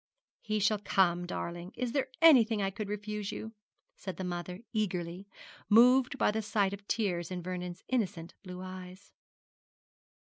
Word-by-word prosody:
'He 215 -1 -1
shall 210 0 +2
come, 175 -3 +2
darling. 175 +1 -5
Is 250 -1 -1
there 275 +1 0 0.2
anything 235 -9 +7
I 195 -1 0
could 205 0 -5
refuse 210 0 -4
you?' 220 - -6 0.5
said 190 -3 -6
the 190 - -4
mother, 180 +1 -4
eagerly, 180 -3 -2 0.4
moved 250 +4 +6
by - - +3
the 220 +1 -1
sight 205 -2 +1
of 200 0 -9
tears 180 -7 -1
in 180 -2 -5
Vernon's 180 0 -5
innocent 200 -9 -1
blue 180 -3 -8
eyes. 185 +1 -9
200 Hz, 150 wpm, -31 LUFS, 180-215 Hz, 0.5 s, anything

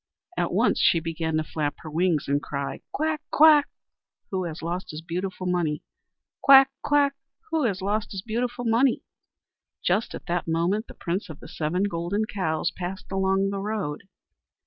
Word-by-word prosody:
At - - 0
once - - +2
she 165 - +4
began 160 -1 -2
to 155 - +1
flap 150 -1 -2
her 155 - -8
wings 165 -1 +1
and 145 +1 +1
cry: 140 -1 -4
"Quack! 310 0 -1
quack! 300 -1 +6 0.6
Who 185 -2 -1
has 165 -1 -6
lost 175 +3 -3
his 155 +1 -7
beautiful 185 +2 -4
money? 175 -4 0 0.6
Quack! 270 -1 +8
quack! 285 -1 +3 0.4
Who 315 -4 +1
has 195 -4 -1
lost 210 +2 -1
his 190 -2 -5
beautiful 245 +2 -2
money?" 235 +3 +3 0.8
Just 195 +5 +1
at - - -9
that 175 0 -2
moment 175 +7 0
the - - -12
Prince 185 +3 -3
of 155 - -9
the - - -11
Seven 165 +5 -1
Golden 200 +2 -1
Cows 160 -7 -1
passed 185 +1 -6
along 195 0 +1
the 200 - -3
road. 200 -6 -3
185 Hz, 170 wpm, -26 LUFS, 165-220 Hz, 0.8 s, Quack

